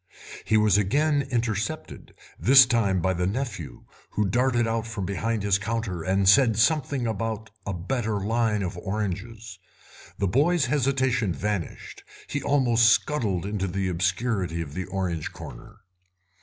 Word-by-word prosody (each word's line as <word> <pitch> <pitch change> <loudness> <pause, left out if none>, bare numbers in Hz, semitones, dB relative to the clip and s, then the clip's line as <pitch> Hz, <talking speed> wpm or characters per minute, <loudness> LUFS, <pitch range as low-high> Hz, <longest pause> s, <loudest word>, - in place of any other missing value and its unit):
He 110 - +3
was 105 -2 +4
again 145 +7 +1
intercepted, 115 -4 -3 0.2
this 130 - +7
time 110 -7 +1
by 95 0 +2
the 90 0 -1
nephew, 100 - -5 0.3
who 105 - -1
darted 120 +4 +1
out 115 0 -2
from 110 -4 -4
behind 105 +3 -2
his 100 -1 +2
counter 105 -4 -3
and 95 +3 +1
said 115 +1 +5
something 135 +1 +1
about 110 0 -3 0.2
a 100 - -2
better 105 +3 -2
line 110 0 0
of 90 - -4
oranges. 105 +1 -5 0.6
The 100 - 0
boy's 145 - +2
hesitation 130 - +1
vanished; 100 +2 -4 0.2
he 145 - -4
almost 120 -5 +3
scuttled 110 - +1
into 100 -1 -2
the 95 +1 -2
obscurity 90 0 -1
of 75 -4 -5
the 95 +3 -4
orange 90 -5 -3
corner. 105 - -11
105 Hz, 140 wpm, -25 LUFS, 95-120 Hz, 0.6 s, this